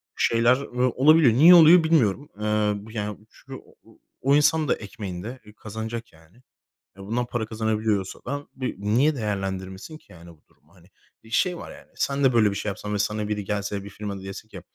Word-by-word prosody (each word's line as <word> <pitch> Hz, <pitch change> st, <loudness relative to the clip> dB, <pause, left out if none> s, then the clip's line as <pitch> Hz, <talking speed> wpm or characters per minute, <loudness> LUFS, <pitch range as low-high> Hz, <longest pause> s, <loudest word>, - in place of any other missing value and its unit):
şeyler, 115 Hz, +2 st, +3 dB
ııı, 125 Hz, -2 st, -1 dB
olabiliyor. 140 Hz, -1 st, +5 dB
Niye 165 Hz, +8 st, +8 dB
oluyor 165 Hz, +1 st, +8 dB
bilmiyorum. 145 Hz, -5 st, +1 dB
Iıı, 105 Hz, -1 st, -1 dB
b 110 Hz, -, -12 dB
yani, 105 Hz, -1 st, -4 dB
çünkü -, -, -11 dB
o -, -, -23 dB, 0.3 s
o 140 Hz, +2 st, +3 dB
insan 155 Hz, +1 st, +3 dB
da -, -, +2 dB
ekmeğinde, 100 Hz, +3 st, -8 dB
eee, 105 Hz, -, -15 dB
kazanacak, 110 Hz, +1 st, -7 dB
yani. 80 Hz, +4 st, -22 dB, 0.6 s
Eee, 100 Hz, -, -10 dB
bundan 120 Hz, +4 st, -2 dB
para 120 Hz, -2 st, -3 dB
kazanabiliyorsa 110 Hz, -3 st, -2 dB
da 140 Hz, +3 st, -5 dB
b 130 Hz, -1 st, -5 dB
niye 120 Hz, +10 st, +1 dB
değerlendirmesin 95 Hz, +3 st, -5 dB
ki -, -, -25 dB
yani 85 Hz, 0 st, -14 dB
bu 80 Hz, -, -21 dB
durumu, 80 Hz, +5 st, -29 dB
hani? 90 Hz, -1 st, -21 dB, 0.4 s
Şey 180 Hz, +6 st, +1 dB
var, -, -, -9 dB
yani, -, -, -14 dB
sen 140 Hz, 0 st, -1 dB
de 130 Hz, -2 st, +4 dB
böyle 110 Hz, -3 st, +4 dB
bir -, -, -5 dB
şey 105 Hz, -, -3 dB
yapsan 105 Hz, +1 st, -6 dB
ve 105 Hz, -, -1 dB
sana 105 Hz, +1 st, -1 dB
biri 105 Hz, -1 st, -3 dB
gelse, 100 Hz, 0 st, -3 dB
bir 100 Hz, -, -9 dB
firma 100 Hz, -1 st, -6 dB
da 95 Hz, -, -11 dB
dese 95 Hz, +2 st, -8 dB
ki, 95 Hz, -5 st, -11 dB
110 Hz, 200 wpm, -24 LUFS, 100-130 Hz, 0.6 s, Niye